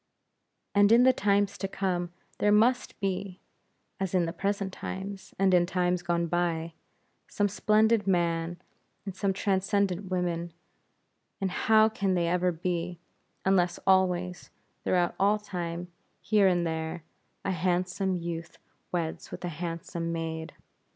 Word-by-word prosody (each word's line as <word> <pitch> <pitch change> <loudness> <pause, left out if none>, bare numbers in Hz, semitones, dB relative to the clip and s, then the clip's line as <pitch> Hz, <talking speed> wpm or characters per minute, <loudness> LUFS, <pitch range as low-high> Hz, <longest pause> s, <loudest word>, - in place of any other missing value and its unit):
And 205 +1 +5
in 235 +2 +7
the 260 0 +6
times 200 -3 +1
to 195 - -1
come, 180 -3 -2 0.3
there 205 - +3
must 235 +5 +3
be 195 -1 -3 0.6
as 190 -1 -1
in 175 -2 +3
the 165 - -4
present 195 -1 -2
times, 190 0 -6
and 195 -1 +3
in 180 - +6
the - - -11
times 180 -1 +1
gone 170 -1 0
by 170 -1 -1 0.5
some 205 - +1
splendid 215 +2 +2
men, 170 -2 0 0.5
and 195 -2 -5
some 195 0 0
transcendent 195 -1 0
women; 175 -2 -2 0.9
and 195 -2 -1
how 220 +3 +4
can 200 -4 0
they 170 -1 +1
ever 180 +1 +2
be, 175 +1 -3 0.5
unless 180 -2 +3
always, 180 -1 +2 0.3
throughout 175 -2 +2
all 200 +2 +4
time, 175 -4 -5 0.3
here 210 -3 +3
and 175 -2 +2
there, 160 0 -3 0.4
a 195 - +1
handsome 180 +2 0
youth 170 -1 -5 0.3
weds 170 -3 -3
with - - -6
a - - -2
handsome 170 0 -4
maid! 160 -1 -4
180 Hz, 140 wpm, -28 LUFS, 170-195 Hz, 0.9 s, in